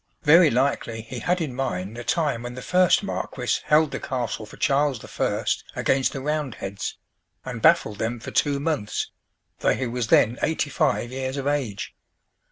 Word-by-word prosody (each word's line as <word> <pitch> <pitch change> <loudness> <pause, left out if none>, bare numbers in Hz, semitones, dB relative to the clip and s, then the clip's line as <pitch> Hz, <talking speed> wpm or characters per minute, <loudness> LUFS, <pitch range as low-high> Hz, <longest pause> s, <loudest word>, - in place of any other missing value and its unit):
Very 165 +2 +7
likely 120 -3 0
he 120 +2 -7
had 180 +5 0
in 150 -6 -2
mind 115 -6 -3
the 120 - -6
time 150 -4 0
when 120 0 -6
the 125 - -7
first 180 +2 +4
marquis 125 -9 -2
held 150 -1 +4
the - - -3
castle 120 -5 -3
for - - -13
Charles 140 -3 +1
I. - - -2 0.3
against 135 -1 +2
the 135 - -4
Roundheads, 130 -9 -3 0.5
and - - -5
baffled 105 -2 +4
them 115 +2 -2
for - - -7
two 145 -2 +1
months, 145 -8 -2 0.5
though - - +2
he 130 - -2
was 120 -1 -2
then 115 +1 +4
eighty 155 -2 0
five 120 - +1
years 130 +1 -3
of 135 - -3
age. 130 -9 -2
130 Hz, 175 wpm, -24 LUFS, 115-145 Hz, 0.5 s, Very